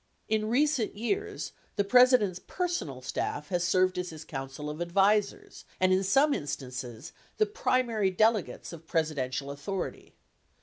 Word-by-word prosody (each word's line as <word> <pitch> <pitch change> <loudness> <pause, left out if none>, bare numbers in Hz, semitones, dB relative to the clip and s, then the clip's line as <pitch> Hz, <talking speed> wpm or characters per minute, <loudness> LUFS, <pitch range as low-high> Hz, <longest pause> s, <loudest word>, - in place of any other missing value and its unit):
In 215 0 0
recent 270 -2 +1
years, 405 - -2 0.2
the 200 - +2
President's 245 -4 +5
personal 180 - -3
staff 145 +3 -3
has 175 -2 0
served 185 +1 +2
as 180 0 -3
his 160 -1 -9
coun 135 -2 -5
cil 150 +2 -7
of 150 +3 -5
advisers, 200 +4 +1 0.2
and 185 0 +4
in 190 +1 +2
some 275 +10 +4
instances, 130 - -5 0.2
the 430 - +4
primary 240 - +1
delegates 215 -1 +1
of 165 -1 -11
Pres 160 -1 +1
idential 130 0 -3
authority. 175 +6 -5
185 Hz, 145 wpm, -29 LUFS, 150-230 Hz, 0.2 s, President's